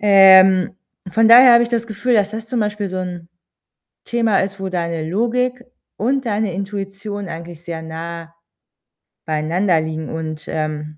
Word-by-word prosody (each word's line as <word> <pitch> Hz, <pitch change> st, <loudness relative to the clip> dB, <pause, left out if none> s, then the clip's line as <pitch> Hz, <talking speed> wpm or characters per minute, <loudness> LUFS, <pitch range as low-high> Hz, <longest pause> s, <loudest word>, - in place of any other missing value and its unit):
Ähm, 190 Hz, -2 st, +6 dB, 0.3 s
von 225 Hz, +3 st, +3 dB
daher 245 Hz, +1 st, +8 dB
habe 235 Hz, -, +6 dB
ich 235 Hz, -, -4 dB
das 235 Hz, -1 st, -2 dB
Gefühl, 225 Hz, +4 st, -2 dB
dass 210 Hz, -2 st, +2 dB
das 220 Hz, +1 st, -7 dB
zum 240 Hz, +1 st, -2 dB
Beispiel 210 Hz, -1 st, -2 dB
so 185 Hz, -, -5 dB
'n 180 Hz, -2 st, -6 dB, 0.8 s
Thema 230 Hz, -4 st, +1 dB
ist, 195 Hz, +1 st, -2 dB
wo 190 Hz, -, -3 dB
deine 170 Hz, -3 st, -3 dB
Logik 245 Hz, +6 st, -1 dB, 0.3 s
und 260 Hz, +5 st, -1 dB
deine 210 Hz, -3 st, -1 dB
Intuition 200 Hz, 0 st, -6 dB
eigentlich 170 Hz, 0 st, -9 dB
sehr 165 Hz, -2 st, -6 dB
nah 165 Hz, +1 st, -8 dB, 0.9 s
beieinander 160 Hz, +3 st, 0 dB
liegen 160 Hz, 0 st, -5 dB
und, 155 Hz, -1 st, -6 dB
ähm, 155 Hz, -1 st, -4 dB
195 Hz, 155 wpm, -19 LUFS, 165-220 Hz, 0.9 s, daher